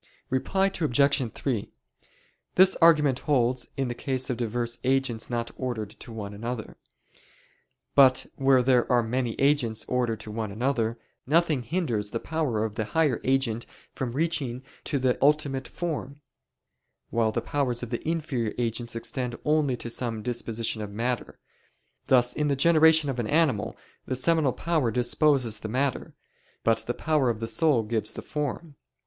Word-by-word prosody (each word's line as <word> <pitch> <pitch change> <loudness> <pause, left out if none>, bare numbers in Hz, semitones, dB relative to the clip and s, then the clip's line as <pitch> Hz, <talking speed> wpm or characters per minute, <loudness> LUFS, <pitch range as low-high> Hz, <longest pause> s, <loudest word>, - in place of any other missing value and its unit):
Reply 190 +9 +1 0.2
Obj. 140 -3 +2
3: 120 -7 -3 0.8
This 190 +1 +6
argument 150 -6 +5
holds 125 -4 +1
in 135 -1 0
the 120 - -2
case 130 0 -2
of 120 - -3
diverse 120 0 -2
agents 130 -3 0
not 120 -1 -2
ordered 115 -5 -3
to 115 - -11
one 105 -2 -6
another. 115 +2 -5 1.2
But 130 -2 +6
where 135 -2 +4
there 125 0 +3
are 120 -1 +4
many 120 0 -1
agents 135 -6 +2
ordered 120 -4 0
to 105 - -8
one 110 -1 -3
another, 115 0 -1 0.3
nothing 160 -2 +3
hinders 120 - -1
the 115 - -3
power 135 -10 -1
of 110 - -4
the 110 0 -2
higher 150 -1 +1
agent 130 -4 0 0.3
from 125 -3 -4
reaching 140 -5 -1 0.2
to 145 - 0
the 130 -2 +1
ultimate 140 -2 +2
form; 145 -4 -5 0.9
while 115 -1 +2
the 115 - -1
powers 125 -1 -1
of 120 - -6
the 120 - -2
inferior 145 -9 -2
agents 120 0 -2
extend 120 +1 -3
only 150 -4 +2
to 120 - -5
some 115 -3 -3
disposition 115 -2 -2
of 105 - -5
matter: 120 +4 -3 0.7
thus 125 -1 +4
in 150 - 0
the 140 - +2
generation 160 +1 +5
of 125 - -5
an 115 - -1
animal, 145 -7 +1 0.3
the 130 - -1
seminal 155 +1 +2
power 160 -8 0
disposes 125 -1 +2
the 110 - -6
matter, 130 +3 -1 0.5
but 115 0 +3
the 120 - -1
power 150 -5 +1
of 115 -2 -2
the 115 - -3
soul 125 +1 +2
gives 110 0 -3
the - - -7
form. 150 +1 -4
125 Hz, 160 wpm, -27 LUFS, 115-145 Hz, 1.2 s, This